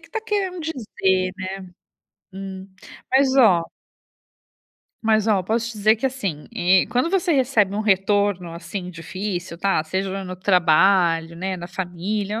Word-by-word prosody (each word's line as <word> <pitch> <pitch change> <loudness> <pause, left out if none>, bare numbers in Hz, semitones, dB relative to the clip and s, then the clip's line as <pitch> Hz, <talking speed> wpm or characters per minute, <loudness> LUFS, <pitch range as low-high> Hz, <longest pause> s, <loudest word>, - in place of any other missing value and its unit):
que 330 - -18
tá 445 - -3
querendo 400 -5 -2
dizer, 195 - -1
né?". 185 - -4 0.9
Hum. 190 0 -7 0.4
Mas 265 0 +3
ó 210 -10 +6 1.4
mas 220 -1 +2
ó, 215 -3 +3
eu 185 - -3
posso 230 +3 -1
te 215 - -10
dizer 215 +2 +4
que, 230 - -8
assim, 200 - -3
eh, 180 +1 +4
quando 250 +6 +1
você 365 -1 +1
recebe 245 -8 +2
um 210 - -1
retorno, 200 -3 +1
assim, 180 +2 -6
difícil, 180 +1 -5
tá, 195 -2 +1
seja 190 +4 -3
no 185 0 -6
trabalho, 175 -2 +3
né, 185 +2 -3
na 175 -1 -7
família, 190 +4 -3
195 Hz, 150 wpm, -22 LUFS, 180-225 Hz, 1.4 s, ó